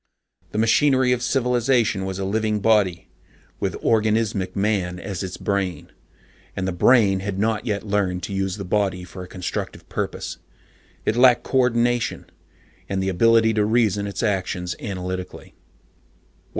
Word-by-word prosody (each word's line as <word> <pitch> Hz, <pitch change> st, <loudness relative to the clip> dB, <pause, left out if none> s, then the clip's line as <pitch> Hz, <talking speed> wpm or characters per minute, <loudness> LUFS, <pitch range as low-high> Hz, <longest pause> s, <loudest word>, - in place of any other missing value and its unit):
The -, -, -4 dB
machinery 130 Hz, +3 st, +3 dB
of 125 Hz, -1 st, +1 dB
civilization 120 Hz, -5 st, +1 dB
was 95 Hz, -1 st, -4 dB
a 95 Hz, -, -3 dB
living 105 Hz, +1 st, 0 dB
body, 100 Hz, -5 st, +1 dB, 0.5 s
with -, -, -2 dB
organismic 110 Hz, -4 st, +1 dB
Man 95 Hz, -3 st, 0 dB
as 95 Hz, -1 st, -5 dB
its 95 Hz, -2 st, -5 dB
brain. 100 Hz, -3 st, -2 dB, 0.6 s
And 95 Hz, -, -2 dB
the -, -, 0 dB
brain 100 Hz, +1 st, +4 dB
had 95 Hz, 0 st, -4 dB
not 110 Hz, +2 st, 0 dB
yet 105 Hz, -1 st, -2 dB
learned 100 Hz, -3 st, -1 dB
to 100 Hz, -, -4 dB
use 95 Hz, 0 st, -2 dB
the 100 Hz, -, -6 dB
body 95 Hz, -1 st, 0 dB
for 90 Hz, +1 st, -9 dB
a 90 Hz, -, -8 dB
constructive 90 Hz, -1 st, -5 dB
purpose. -, -, -4 dB, 0.7 s
It 110 Hz, -, +1 dB
lacked 125 Hz, 0 st, +5 dB
coordination, 120 Hz, -2 st, +1 dB, 0.6 s
and 95 Hz, -1 st, -1 dB
the 95 Hz, -, 0 dB
ability 110 Hz, +4 st, +4 dB
to 105 Hz, -1 st, +2 dB
reason 105 Hz, -2 st, +1 dB
its 100 Hz, -, -4 dB
actions 95 Hz, -4 st, -1 dB
analytically. 90 Hz, -2 st, -6 dB
100 Hz, 145 wpm, -22 LUFS, 95-115 Hz, 0.7 s, lacked